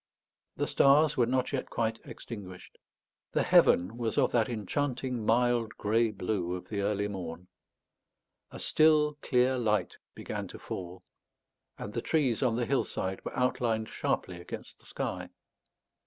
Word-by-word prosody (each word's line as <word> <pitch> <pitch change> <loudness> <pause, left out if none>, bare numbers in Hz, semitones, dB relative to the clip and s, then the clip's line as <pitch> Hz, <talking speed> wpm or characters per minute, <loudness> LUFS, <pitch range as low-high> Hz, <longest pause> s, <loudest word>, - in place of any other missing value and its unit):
The - - -1
stars 145 +2 +4
were 120 -2 +3
not 130 +2 0
yet 135 - -2
quite 115 -1 -1
extinguished. 95 -6 -10 0.5
The - - +2
heaven 95 +7 +4
was 115 -2 -2
of - - +3
that 115 -1 +2
enchanting 125 +2 -2
mild 120 0 +2
grey 115 +2 +2
blue 95 -3 -2
of 90 - -9
the 100 -2 -2
early 100 0 0
morn. 90 -3 -7 1.0
A - - -9
still 150 -1 +3
clear 125 0 +2
light 105 -5 0 0.2
began - - -5
to - - -9
fall, 90 0 -7 0.7
and 105 - -7
the 120 - -2
trees 135 -7 +1
on 125 -4 +2
the 120 0 0
hillside 95 -7 -1
were - - -6
outlined 115 -3 0
sharply 90 -1 -2
against 90 - -8
the - - -17
sky. - - -4
115 Hz, 145 wpm, -30 LUFS, 100-125 Hz, 1.0 s, stars